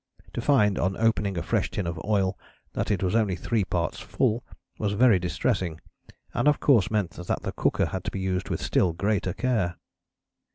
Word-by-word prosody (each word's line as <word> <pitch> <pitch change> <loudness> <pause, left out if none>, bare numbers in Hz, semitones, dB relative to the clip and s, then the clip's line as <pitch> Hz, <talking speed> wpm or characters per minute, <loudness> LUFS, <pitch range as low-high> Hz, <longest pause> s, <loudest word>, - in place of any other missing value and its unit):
To - - -2
find 110 -7 +3
on 95 +2 0
opening 100 -4 +1
a 85 - -1
fresh - - 0
tin 100 - -3
of 85 0 -4
oil 100 -3 +1 0.4
that - - -2
it 100 -3 0
was 90 - +1
only 110 -5 +2
three 110 +3 0
parts 85 -3 -2
full 115 +3 0 0.4
was 105 -1 0
very 110 -2 +5
distressing, 85 -1 -1 0.5
and - - +1
of 150 - +4
course 120 -10 +4
meant 105 -6 0
that 90 +2 -4
the - - -2
cooker - - +1
had 95 -1 -4
to - - 0
be 95 - -5
used 95 0 -2
with - - -2
still 90 -3 +2
greater 100 0 0
care." 110 -9 0
100 Hz, 195 wpm, -26 LUFS, 90-110 Hz, 0.5 s, very